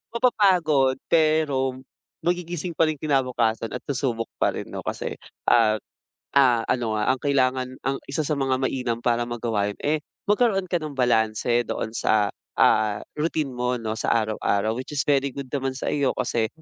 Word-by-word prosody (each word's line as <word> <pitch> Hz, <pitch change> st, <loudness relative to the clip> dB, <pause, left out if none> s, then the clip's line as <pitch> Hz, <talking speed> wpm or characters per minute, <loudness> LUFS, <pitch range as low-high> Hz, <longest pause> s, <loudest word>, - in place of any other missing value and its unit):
mapapagod 180 Hz, -, +3 dB, 0.2 s
pero 155 Hz, -5 st, +2 dB, 0.5 s
magigising 175 Hz, -1 st, -2 dB
pa 165 Hz, -, +5 dB
rin 155 Hz, -3 st, -2 dB
kinabukasan 125 Hz, -6 st, 0 dB
at -, -, -4 dB
susubok 120 Hz, -4 st, -1 dB
pa -, -, +3 dB
rin -, -, -5 dB
'no, -, -, -5 dB
kasi, -, -, -4 dB, 0.3 s
ah, 110 Hz, -2 st, +4 dB, 0.6 s
ah, 125 Hz, -4 st, +5 dB
ano 120 Hz, -3 st, 0 dB
nga, 105 Hz, +1 st, 0 dB
ang 130 Hz, -, 0 dB
kailangan, 130 Hz, -2 st, +1 dB
ang 135 Hz, 0 st, 0 dB
isa 140 Hz, +3 st, -3 dB
sa 150 Hz, 0 st, -1 dB
mga 135 Hz, -1 st, +1 dB
mainam 125 Hz, -3 st, -1 dB
para 120 Hz, 0 st, +1 dB
magawa 115 Hz, -4 st, -1 dB
yun, -, -, -20 dB
eh, 155 Hz, +1 st, +1 dB, 0.3 s
magkaroon 205 Hz, -4 st, +2 dB
ka 175 Hz, -, +1 dB
ng 155 Hz, -3 st, -4 dB
balanse 120 Hz, -1 st, +2 dB
doon 110 Hz, 0 st, -4 dB
sa, 105 Hz, -2 st, +2 dB, 0.3 s
ah, 110 Hz, -1 st, +4 dB, 0.2 s
routine 155 Hz, -1 st, 0 dB
mo 125 Hz, 0 st, -1 dB
'no, 110 Hz, -1 st, -3 dB
sa -, -, 0 dB
araw-araw. 110 Hz, -1 st, 0 dB
Which 130 Hz, +3 st, -6 dB
is 140 Hz, -, 0 dB
very 140 Hz, -1 st, +2 dB
good 140 Hz, -1 st, -7 dB
naman 135 Hz, -2 st, -1 dB
sa -, -, -3 dB
iyo 140 Hz, -3 st, +1 dB
kasi 115 Hz, -3 st, 0 dB
130 Hz, 170 wpm, -24 LUFS, 115-150 Hz, 0.6 s, pa